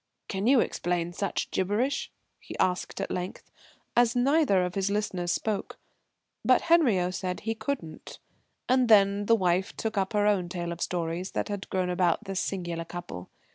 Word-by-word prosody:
"Can 195 +1 -2
you 260 -2 +6
explain 175 0 -1
such 200 +3 -2
gibberish?" 210 +9 0 0.3
he - - -9
asked 180 -1 0
at - - -3
length, 180 +1 -5 0.4
as 240 0 +4
neither 255 - +3
of 180 - -4
his 195 0 0
listeners 195 -4 -1
spoke. 210 +2 -2 0.7
But - - +4
Henriot 230 - +3
said 185 -1 -3
he 225 +1 -1
couldn't. 225 - -5 0.5
And 255 -1 +3
the 205 0 +5
wife 185 -1 +1
then - - -33
took 220 -2 -1
up 190 +2 -1
her 205 -1 +2
own 195 -4 +2
tale 175 -1 -4
of 170 - -7
stories 175 +1 -2
that - - -2
had 200 -1 -5
grown 185 -2 0
about 180 +2 +1
this 195 -2 -3
singular 175 -3 -3
couple. 170 - -8
190 Hz, 170 wpm, -28 LUFS, 180-220 Hz, 0.7 s, you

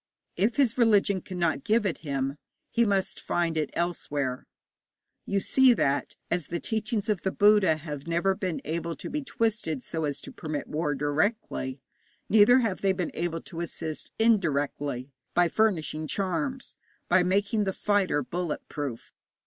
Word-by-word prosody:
If 215 +5 +1
his 260 -3 +2
religion 205 -4 +4
cannot 170 -6 -1
give 220 0 +2
it 185 - -1
him, 140 -1 -2 0.3
he 235 0 +3
must 195 -3 0
find 170 -2 0
it 155 -2 0
elsewhere. 145 -7 -2 0.8
You 200 - +1
see 260 +4 +5
that, 140 -7 0 0.2
as 175 -4 0
the 170 - -3
teachings 215 0 -2
of 210 -5 0
the 190 - 0
Buddha 205 -6 +5
have 150 -1 -7
never 170 +3 +2
been 185 -3 -3
able 165 +1 -2
to - - -7
be 300 - -1
twisted 220 - -1
so 160 -2 -2
as 145 -1 -3
to - - -9
permit 155 -2 -4
war 150 -1 -1
directly, 145 - -1 0.5
neither 220 +4 +7
have 225 -7 0
they 195 -1 +3
been 180 -2 -2
able 165 -1 -2
to 165 - -9
assist 160 -2 -5
indirectly 145 - +1 0.2
by 175 0 +5
furnishing 165 -7 0
charms, 205 - -2 0.3
by 185 +1 +5
making 205 +4 +1
the 190 - 0
fighter 190 -7 +1
bullet 175 +4 -4
proof. 140 -6 -5
175 Hz, 155 wpm, -27 LUFS, 155-205 Hz, 0.8 s, neither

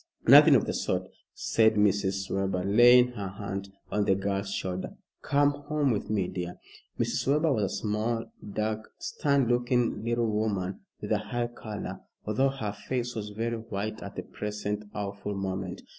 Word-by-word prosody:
"Nothing - - +9
of - - +3
the - - -2
sort," - - -1 0.3
said 110 -1 +3
Mrs. 100 -2 +1
Webber, 95 -1 0
laying 120 +5 +7
her 105 -5 -5
hand 100 0 -5 0.2
on 105 -1 +1
the 95 - +4
girl's 100 0 -2
shoulder. 95 -1 -4 0.2
"Come 145 0 +3
home 145 -1 -1
with 105 - -2
me, 100 -4 +1
dear." 90 -1 -5 0.4
Mrs. - - 0
Webber 150 +2 +3
was 110 - +1
a - - -2
small, 110 +2 -1 0.3
dark, 110 +1 -2
stern 140 -3 +1
looking 120 -1 +1
little 120 0 +1
woman 105 -4 -1 0.2
with 105 - -5
a 105 - +3
high 120 +3 -2
color, 110 -3 -6 0.3
although 120 +6 +2
her 120 -7 -3
face 120 +3 -3
was 105 -2 -4
very 115 +3 -2
white 110 -1 -4
at - - -8
the - - -4
present 105 0 -4
awful 100 0 -4
moment. 95 -1 -4
105 Hz, 165 wpm, -28 LUFS, 100-120 Hz, 0.4 s, Nothing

